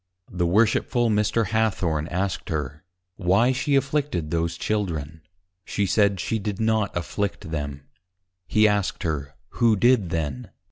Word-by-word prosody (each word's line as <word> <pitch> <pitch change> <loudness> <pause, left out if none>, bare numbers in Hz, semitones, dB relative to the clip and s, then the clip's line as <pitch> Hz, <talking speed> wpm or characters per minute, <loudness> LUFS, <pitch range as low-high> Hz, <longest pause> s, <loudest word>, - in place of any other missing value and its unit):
The 90 -1 0
Worshipful 115 +4 +2
Mr. 105 0 +1
Hathorne 95 -9 0
asked 95 +1 -2
her, 75 - -4 0.3
Why 100 +7 +3
she 130 +2 0
afflicted 135 - 0
those 85 0 -1
Children? 80 -8 -2 0.4
She 100 - -1
said, 100 -1 +2
she 110 +6 -1
did 100 -1 -4
not 110 -4 +1
Afflict 90 -1 -3
them. 70 -2 -4 0.6
He 110 0 +4
asked 105 -2 0
her, 70 -3 -3
who 115 +1 +3
did 115 -3 +3
then? 75 -7 -3
100 Hz, 135 wpm, -24 LUFS, 85-110 Hz, 0.6 s, He